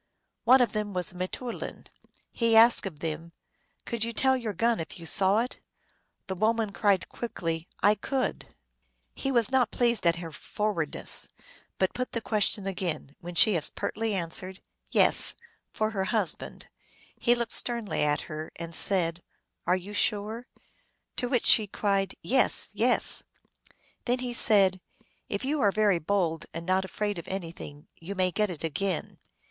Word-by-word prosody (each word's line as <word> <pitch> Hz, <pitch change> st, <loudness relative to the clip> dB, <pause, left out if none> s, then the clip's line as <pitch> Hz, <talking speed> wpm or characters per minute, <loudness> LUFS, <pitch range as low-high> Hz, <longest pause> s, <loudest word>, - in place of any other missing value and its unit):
One 255 Hz, +2 st, +7 dB
of 240 Hz, -4 st, +2 dB
them 210 Hz, -2 st, -3 dB
was 180 Hz, 0 st, -2 dB
a -, -, -17 dB
mteoulin. 185 Hz, +7 st, -5 dB, 0.5 s
He 230 Hz, -1 st, +2 dB
asked 230 Hz, -2 st, +6 dB
of 155 Hz, -5 st, -10 dB
them, 165 Hz, +1 st, -5 dB, 0.2 s
" -, -, -40 dB
Could 235 Hz, -2 st, -2 dB
you 230 Hz, 0 st, -1 dB
tell 265 Hz, +3 st, +2 dB
your 235 Hz, -4 st, -3 dB
gun 230 Hz, +4 st, +1 dB
if 165 Hz, -, -6 dB
you 170 Hz, -, -10 dB
saw 195 Hz, +6 st, +3 dB
it? 250 Hz, -, -5 dB, 0.3 s
" -, -, -46 dB
The 190 Hz, -, -4 dB
woman 220 Hz, +2 st, 0 dB
cried 200 Hz, -2 st, +1 dB
quickly, 165 Hz, -8 st, -4 dB
" -, -, -27 dB
I 205 Hz, +2 st, +6 dB
could! 260 Hz, +5 st, -3 dB, 0.4 s
" -, -, -45 dB
He 270 Hz, -, -3 dB
was 235 Hz, -2 st, +3 dB
not 255 Hz, -4 st, +3 dB
pleased 235 Hz, -6 st, +1 dB
at 170 Hz, -, +4 dB
her 170 Hz, -1 st, -7 dB
forwardness, 170 Hz, -1 st, -2 dB, 0.5 s
but 190 Hz, -, +1 dB
put 255 Hz, 0 st, -4 dB
the 230 Hz, -, -1 dB
question 210 Hz, -2 st, 0 dB
again; 180 Hz, -7 st, -4 dB
when 175 Hz, 0 st, -8 dB
she 210 Hz, +2 st, +5 dB
as 155 Hz, -, 0 dB
pertly 220 Hz, 0 st, -3 dB
answered, 185 Hz, +1 st, -5 dB, 0.2 s
" -, -, -29 dB
Yes," -, -, +7 dB, 0.4 s
for 215 Hz, 0 st, -1 dB
her 195 Hz, -3 st, -2 dB
husband. 200 Hz, -5 st, -3 dB, 0.5 s
He 240 Hz, 0 st, +3 dB
looked 235 Hz, -1 st, -3 dB
sternly 235 Hz, -4 st, 0 dB
at 150 Hz, 0 st, +1 dB
her, 155 Hz, +1 st, -7 dB
and 170 Hz, 0 st, -7 dB
said, 170 Hz, -1 st, +3 dB, 0.2 s
" -, -, -43 dB
Are 180 Hz, -, +4 dB
you 190 Hz, +3 st, -9 dB
sure? 215 Hz, +4 st, -1 dB, 0.3 s
" -, -, -45 dB
To 245 Hz, -, 0 dB
which 245 Hz, -2 st, +1 dB
she 215 Hz, -2 st, +6 dB
cried, 195 Hz, -1 st, -1 dB
" -, -, -43 dB, 0.2 s
Yes, -, -, +1 dB
yes! -, -, +2 dB, 0.4 s
" -, -, -32 dB
Then 245 Hz, +1 st, +1 dB
he 250 Hz, -1 st, -4 dB
said, 195 Hz, -5 st, +4 dB, 0.2 s
" -, -, -42 dB
If 200 Hz, +5 st, -3 dB
you 290 Hz, +1 st, 0 dB
are 205 Hz, -, +4 dB
very 205 Hz, -4 st, +2 dB
bold, 165 Hz, -2 st, -1 dB
and 165 Hz, 0 st, -5 dB
not 185 Hz, +1 st, +1 dB
afraid 205 Hz, -1 st, -3 dB
of 170 Hz, -, -10 dB
anything, 165 Hz, -5 st, -7 dB
you 185 Hz, +5 st, -7 dB
may 185 Hz, -1 st, +1 dB
get 210 Hz, +2 st, 0 dB
it 170 Hz, -3 st, -7 dB
again." 175 Hz, +3 st, -2 dB
200 Hz, 185 wpm, -28 LUFS, 175-230 Hz, 0.5 s, One